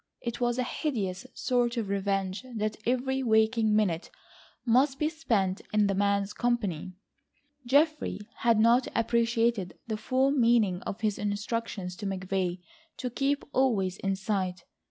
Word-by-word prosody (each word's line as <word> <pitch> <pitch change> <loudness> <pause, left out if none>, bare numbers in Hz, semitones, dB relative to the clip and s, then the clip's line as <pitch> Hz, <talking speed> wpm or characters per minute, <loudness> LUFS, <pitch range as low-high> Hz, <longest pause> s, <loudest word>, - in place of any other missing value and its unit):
It 235 0 -5
was 240 0 +1
a 255 - +1
hideous 235 - -3
sort 245 -1 0
of 225 -3 -1
revenge 195 +1 -1
that 215 0 -1
every 265 +2 +1
waking 220 -2 +3
minute 185 -6 +1 0.6
must 260 +3 +3
be 305 +2 +1
spent 215 - 0
in 210 -1 +3
the 200 - +1
man's 200 0 +1
company. 200 -8 -1 0.7
Geoffrey 300 +2 +2 0.2
had 230 -2 +3
not 235 +3 +4
appreciated 230 -4 +1
the 220 -2 -3
full 260 +4 +1
meaning 230 -8 +3
of 200 - -5
his 215 -2 0
instructions 205 -2 -3
to 205 - -4
McVay 190 -2 -2 0.4
to 250 -2 -4
keep 280 +3 0
always 200 -8 +1
in 195 0 -1
sight. 190 -3 -2
220 Hz, 140 wpm, -28 LUFS, 195-245 Hz, 0.7 s, not